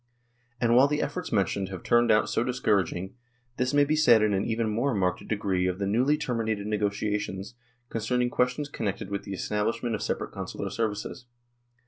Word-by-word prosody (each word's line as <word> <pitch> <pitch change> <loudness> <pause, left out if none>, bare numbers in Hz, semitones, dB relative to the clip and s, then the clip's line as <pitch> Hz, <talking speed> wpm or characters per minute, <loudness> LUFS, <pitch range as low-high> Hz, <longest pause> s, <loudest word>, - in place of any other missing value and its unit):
" 120 0 -41
And 120 -1 +3
while 130 +3 +7
the 150 +1 -1
efforts 180 - -3
mentioned 100 -2 0
have 95 -3 -7
turned 120 0 +3
out 110 -1 +4
so 115 - 0
discouraging, 100 -7 0 0.4
this 125 0 +1
may 145 0 +4
be 150 +2 +1
said 120 -8 +5
in 105 -1 +2
an 95 0 +1
even 115 0 0
more 120 +4 0
marked 90 -2 -1
degree 95 -4 0
of 90 0 -1
the 100 - -2
newly 125 +9 +2
terminated 110 -7 -2
negotiations 105 0 -2 0.2
" 120 0 -42
concerning 120 +2 0
questions 125 +4 0
connected 100 -7 -4
with 100 0 -3
the 100 - -5
establishment 115 +4 -1
of 105 - -2
separate - - -2
Consular - - -5
services. 115 +2 -3
110 Hz, 185 wpm, -27 LUFS, 100-125 Hz, 0.4 s, while